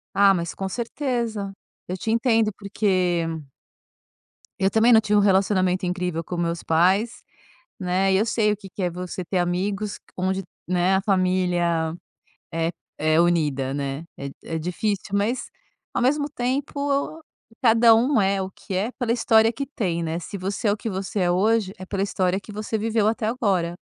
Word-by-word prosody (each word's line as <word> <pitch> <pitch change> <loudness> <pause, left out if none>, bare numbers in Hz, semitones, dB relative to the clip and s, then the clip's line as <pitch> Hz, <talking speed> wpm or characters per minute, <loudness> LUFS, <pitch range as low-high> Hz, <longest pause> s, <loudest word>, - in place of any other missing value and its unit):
Ah, 200 0 +6
mas 170 -3 -1
com 195 0 -4
certeza, 235 -3 -2 0.4
eu 185 - -3
te 220 +4 -2
entendo 225 -2 +3
porque 185 -4 0 1.4
eu 190 0 +3
também 225 +3 +5
não 220 - +7
tinha 210 -1 +2
um - - +5
relacionamento 190 -2 +2
incrível 180 -2 -2
com 175 +2 -5
meus 170 0 -1
pais, 185 +8 +2 0.6
né. 190 +1 +1
E - - +4
eu 210 - +3
sei 215 -2 +2
o 210 - -2
que 195 -1 -11
que 195 - -6
é 180 - +1
você 180 +1 -5
ter 185 - -1
amigos 195 +4 -1 0.2
onde, 190 +1 -1 0.2
né, 180 +1 +2
a 190 - 0
família 180 -4 +1 0.6
é 165 0 0 0.3
é 155 +1 +2
unida, 150 -6 +1
né. 140 +2 -3
É 140 0 -5
é 165 - -3
difícil. 195 +4 -2
Mas, 210 +5 0 0.4
ao - - 0
mesmo 285 +4 +2
tempo 280 +3 -2 0.4
cada 230 -1 +6
um 240 +1 +3
é 195 0 +1
o 190 - -3
que 190 - -9
é, 205 +6 0
pela 240 -2 0
história 225 -2 +4
que 275 - -3
tem, 180 - -2
né. 165 +1 -2
Se 185 +4 -7
você 195 +4 -2
é, - - +4
o 205 - -1
que 225 - -4
você 195 +1 -3
é 175 -1 +2
hoje, 205 +1 +2
é 185 - -8
pela 195 0 -2
história 190 -1 0
que 205 - -12
você 215 +1 -3
viveu 220 0 +1
até 220 0 0
agora. 195 -8 0
195 Hz, 180 wpm, -24 LUFS, 180-220 Hz, 1.4 s, não